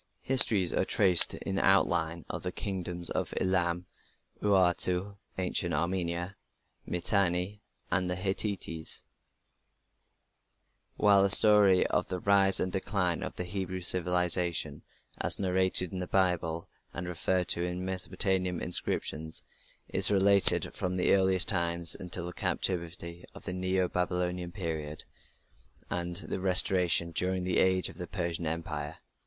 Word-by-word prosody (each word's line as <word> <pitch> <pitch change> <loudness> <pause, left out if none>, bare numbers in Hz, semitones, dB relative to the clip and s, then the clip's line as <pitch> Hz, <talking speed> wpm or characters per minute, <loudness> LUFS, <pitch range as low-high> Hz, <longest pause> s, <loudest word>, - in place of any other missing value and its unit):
The - - -20
histories 100 -9 +5
are - - +2
traced 95 -3 +5
in 95 0 -4
outline 85 -4 0
of - - -6
the 90 - -5
Kingdoms 90 -3 0
of - - -4
Elam, 90 -1 -1 0.6
Urartu 95 0 0 0.2
(Ancient 90 -3 -1
Armenia), 85 +2 -3 0.5
Mitanni, 90 +2 -1 0.3
and 90 0 +3
the 90 - -2
Hittites, 95 -3 -5 1.9
while 100 -2 +3
the 100 - +2
story 100 -2 +7
of - - -1
the 90 - -5
rise 100 0 +2
and 95 - -1
decline 95 -2 -2
of - - -6
the - - -5
Hebrew 95 0 -5
civilization, 90 -3 0 0.4
as - - +2
narrated 95 -1 +2
in 95 - -5
the 90 - -5
Bible 90 -3 -1 0.3
and 85 +1 -5
referred 90 +1 -2
to 85 - 0
in 90 +1 -4
Mesopotamian 95 -1 -1
inscriptions, 80 -2 -1 0.4
is - - +4
related 100 -1 +3
from 90 0 -4
the 90 - +2
earliest 95 -1 +4
times 85 -1 +1
until 90 -1 -5
the 90 - -8
captivity 85 -1 -4
in - - -11
the 90 - -5
Neo 95 0 -1
Babylonian 90 0 -3
period 80 -5 -6 0.9
and 85 0 -4
the 95 0 -5
restoration 90 -2 +4
during 90 +2 -2
the 90 -1 -1
age 95 0 +1
of 85 - -13
the 90 - -7
Persian 85 -3 -4
Empire. 80 -2 -5
90 Hz, 135 wpm, -28 LUFS, 85-95 Hz, 1.9 s, story